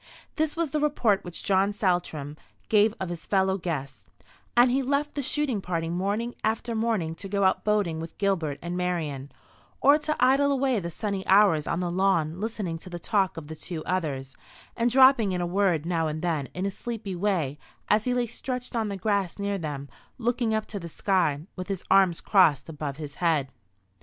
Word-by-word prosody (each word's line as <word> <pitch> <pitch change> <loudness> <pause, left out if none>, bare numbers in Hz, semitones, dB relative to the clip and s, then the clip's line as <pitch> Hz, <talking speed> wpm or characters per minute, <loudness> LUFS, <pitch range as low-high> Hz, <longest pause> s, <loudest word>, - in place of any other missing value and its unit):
This 315 0 -1
was 335 -4 0
the 305 - 0
report 250 -9 +2
which 175 -1 -6
John 195 +1 +2
Saltram 175 - -1 0.3
gave 215 0 +4
of 190 - -3
his 170 -2 -7
fellow 190 -1 +2
guests; 140 -6 -5 0.5
and 245 +1 +6
he 270 +2 +2
left 280 +3 0
the 285 - -2
shooting 270 -5 -1
party 165 -3 -2
morning 200 +7 -1
after 225 +2 -1
morning 220 -8 0
to 195 +4 -9
go 200 0 0
out 190 - +2
boating 205 -7 +1
with 165 0 -8
Gilbert 170 -8 0
and 175 +1 -3
Marian, 160 -7 -2 0.5
or 285 +2 +6
to 305 0 -1
idle 275 +3 +4
away 265 -4 +1
the 170 -2 -4
sunny 200 +2 -3
hours 190 -6 +5
on 170 - -1
the 175 -1 -1
lawn 175 -3 +1
listening 205 -7 -3
to 185 - -11
the 175 - -5
talk 190 0 0
of 160 - -6
the 160 +2 -8
two 155 0 -7
others, 140 -8 -2 0.4
and 235 0 +2
dropping 260 -5 +5
in 180 - -1
a - - 0
word 175 -3 +1
now 165 -2 0
and 155 +1 -4
then 160 -6 -1
in 185 +2 -2
a 200 - -1
sleepy 220 -3 -5
way 170 -7 -1 0.3
as 210 +1 +3
he 250 -1 +1
lay 245 -1 +1
stretched 250 +2 -5
on 220 -2 0
the 200 - -4
grass 200 -2 0
near 200 -1 -2
them, 145 -4 -5 0.3
looking 240 -1 0
up 220 0 0
to 205 - -6
the 170 -2 -7
sky, 170 -5 +1
with 185 -1 -6
his 195 -3 -4
arms 190 -4 +4
crossed 185 -8 +4
above 150 -3 -5
his 150 -3 -7
head. 155 -6 +1
190 Hz, 200 wpm, -26 LUFS, 165-225 Hz, 0.5 s, and